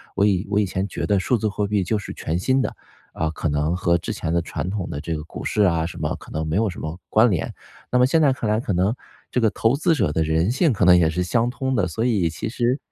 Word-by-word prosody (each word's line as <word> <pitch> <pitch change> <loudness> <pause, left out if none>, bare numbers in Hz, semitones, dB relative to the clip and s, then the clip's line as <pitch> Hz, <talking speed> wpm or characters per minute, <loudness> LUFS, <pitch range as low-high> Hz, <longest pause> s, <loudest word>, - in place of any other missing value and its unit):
我 100 - +3
以 95 -3 +1
我 105 - +2
以 105 - +2
前 95 +1 -2
觉 - - -4
得 100 - +2
数 105 +6 +1
字 110 - -1
货 105 0 -1
币 100 0 +1
就 105 +5 0
是 105 - -6
全 80 +2 -3
新 130 +8 +2
的， - - -3 0.4
啊， 80 - -1
可 80 0 -3
能 75 +3 0
和 85 -1 +2
之 85 - -5
前 85 -6 -3
的 85 - +2
传 85 +2 -4
统 95 -2 -3
的 70 - -4
这 80 +1 -3
个 75 - -5
股 - - -8
市 105 - 0
啊 85 -4 +2
什 85 - -7
么， - - -2
可 - - -14
能 80 +1 -2
没 80 +3 -1
有 110 0 +2
什 90 - -8
么 80 +3 -5
关 110 +2 +4
联。 85 - -2 0.4
那 125 - +2
么 125 - +5
现 160 +5 +3
在 140 -3 +4
看 115 -4 -3
来 110 - +2
可 110 -5 -2
能 95 +5 +2 0.4
这 - - +1
个 110 -3 +3
投 115 +4 +2
资 165 +4 +2
者 75 - +1
的 80 +1 +1
人 80 +6 +1
性 135 +1 +2
可 95 - 0
能 90 0 +7
也 80 -2 +3
是 90 +3 -1
相 115 +6 +1
通 130 +1 -2
的， 100 -7 +1
所 110 +7 -3
以 105 -8 +2
其 85 +7 -5
实 125 +2 0
100 Hz, 315 characters per minute, -22 LUFS, 85-115 Hz, 0.4 s, 能